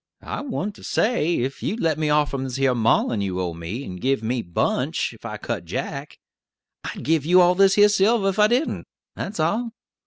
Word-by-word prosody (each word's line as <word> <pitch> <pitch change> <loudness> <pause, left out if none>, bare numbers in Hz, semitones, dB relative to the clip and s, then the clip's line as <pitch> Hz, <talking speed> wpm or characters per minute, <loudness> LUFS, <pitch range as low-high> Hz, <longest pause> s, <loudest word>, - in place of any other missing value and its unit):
I - - -4
went 240 -7 -3
to - - -15
say 215 -8 +1
that - - +1
ef 135 - -6
you'd 220 - -2
let 160 -4 0
me 155 -1 0
off 150 0 +2
from 135 -1 -3
this 130 -1 -4
her 135 -1 +2
maulin' 115 -2 +2
you 95 -2 -2
owe 90 -2 -2
me, 85 +10 -6
and 90 -7 -8
give 135 -3 0
me 120 +2 -1
'Bunch,' 85 -5 -1
if - - -16
I - - -5
cut - - -4
Jack, - - -5 0.7
I'd - - -6
give 160 -2 +2
you 180 +4 +5
all 180 0 +6
this 195 +1 +4
here 205 0 +7
silver, 205 0 +3
ef 195 +2 -3
I 210 - +6
didn't, 245 +7 -1 0.3
that's 195 -2 -5
all. 220 +9 0
155 Hz, 220 wpm, -23 LUFS, 125-200 Hz, 0.7 s, here